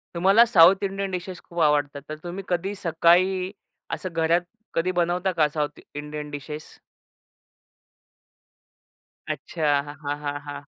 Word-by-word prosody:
तुम्हाला 195 +7 +6
south 190 -2 +6
Indian 195 0 -2
dishes 180 0 -5
खूप 170 - -8
आवडतात, 145 -2 +2
तर 155 - -4
तुम्ही 180 +3 -5
कधी 185 +3 -1
सकाळी 180 +2 +3 0.4
असं 185 - -5
घरात 165 +1 +2 0.3
कधी 165 +2 +1
बनवता 175 +2 +1
का 160 -4 +3
साउथ 150 -1 -3 0.2
इंडियन 150 0 -6
डिशेस? 150 +1 -6 2.7
अच्छा. 165 - -4 0.2
हां, 145 0 -5
हां, 145 0 -2
हां. 145 0 -8
170 Hz, 125 wpm, -25 LUFS, 150-185 Hz, 2.7 s, तुम्हाला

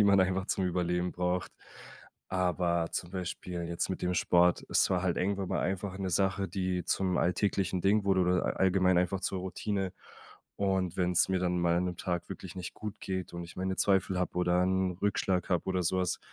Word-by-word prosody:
die - - +6
man 100 -1 +5
einfach 95 +1 +1
zum 95 - 0
Überleben 90 0 0
braucht. 90 0 -1 0.8
Aber 90 -2 +1
zum 85 - -3
Beispiel 90 -1 -4
jetzt 85 0 -2
mit 95 - -3
dem 90 0 0
Sport, 90 0 +3
es - - +3
war 90 -2 +1
halt 90 -2 0
irgendwann 95 0 -1
mal - - -1
einfach 95 +1 -2
'ne 95 -1 -2
Sache, 95 +1 +1
die 90 -2 -2
zum 95 -2 0
alltäglichen 95 0 +1
Ding 100 +3 +3
wurde 95 -1 +3
oder 90 0 +2
a - - +1
allgemein 95 -1 +3
einfach 90 +1 0
zur 95 0 -2
Routine. 95 +1 -2 0.6
Und 95 -3 0
wenn's 90 -2 +3
mir 95 0 +1
dann 90 -1 0
mal 85 -1 +2
an 90 - 0
'nem 90 -1 -4
Tag 90 -2 -3
wirklich 95 -1 -8
nicht 90 -1 -6
gut 105 -1 -7
geht 95 -2 -4
und 85 - -5
ich 85 - -12
meine 95 +1 -1
Zweifel 95 -1 +2
habe 90 - -2
oder 90 0 +3
'n 95 0 +1
Rückschlag 95 -3 0
habe 90 - +1
oder 95 -1 0
so 95 +3 +1
was, 90 -2 0
90 Hz, 205 wpm, -30 LUFS, 90-95 Hz, 0.8 s, die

